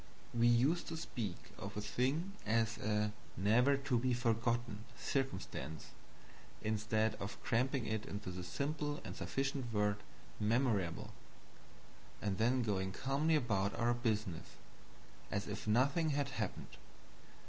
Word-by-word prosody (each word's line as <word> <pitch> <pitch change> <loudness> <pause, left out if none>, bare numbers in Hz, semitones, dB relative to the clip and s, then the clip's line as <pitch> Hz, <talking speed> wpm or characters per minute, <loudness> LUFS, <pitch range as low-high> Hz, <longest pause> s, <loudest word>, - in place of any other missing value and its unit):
We 120 0 +4
used 130 +9 +4
to 165 - -3
speak 110 - -3 0.2
of 100 +1 -6
a - - 0
thing 135 - 0
as 115 +1 +1
a 105 0 +1 0.3
"never 120 +9 +5
to 135 -3 +1
be 125 0 +2
forgotten" 115 -2 0
circumstance, 95 - -2 0.7
instead 110 +1 +1
of 100 - -5
cramping 125 +1 +1
it 110 0 -2
into 100 -2 -4
the 90 0 -5
simple 145 - -2
and - - -6
sufficient 135 -2 -2
word 105 -1 +2 0.4
"memorable" 110 -5 +1 1.1
and 100 -3 -1
then 120 +3 +3
going 95 -3 0
calmly 140 +8 +2
about 100 -8 +1
our 120 +1 +3
business 110 -8 -1 0.7
as 100 - -1
if 105 +1 -5
nothing 140 +9 +3
had 140 -1 +1
happened. 110 -6 -4
115 Hz, 125 wpm, -37 LUFS, 105-135 Hz, 1.1 s, never